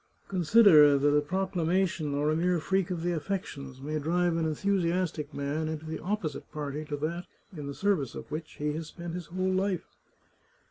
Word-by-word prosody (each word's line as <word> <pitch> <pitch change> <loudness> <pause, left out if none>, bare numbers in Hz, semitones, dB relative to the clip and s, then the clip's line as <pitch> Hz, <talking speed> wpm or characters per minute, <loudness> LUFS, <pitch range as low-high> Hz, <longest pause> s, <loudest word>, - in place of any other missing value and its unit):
" - - -38
Consider 170 -6 +7
that 145 +1 +3
a 150 - +5
proclamation, 175 -2 0
or 150 +2 +1
a - - +1
mere 175 +2 +2
freak 190 +3 0
of 175 -3 -3
the 175 - +1
affections, 150 -6 -4
may 155 +3 -3
drive 175 +3 +1
an 165 -1 0
enthusiastic 170 -2 0
man 145 +3 -2
into 155 0 -4
the 160 0 -4
opposite 180 -5 -3
party 150 0 -4
to 150 -1 -4
that 170 +4 -3 0.3
in 145 -3 -6
the 140 - -5
service 190 - 0
of - - -8
which 155 +1 -5
he 150 0 -2
has 160 0 -5
spent 170 +1 -7
his 175 -3 -5
whole 185 +1 -1
life." 190 -1 0
160 Hz, 190 wpm, -29 LUFS, 150-180 Hz, 0.3 s, Consider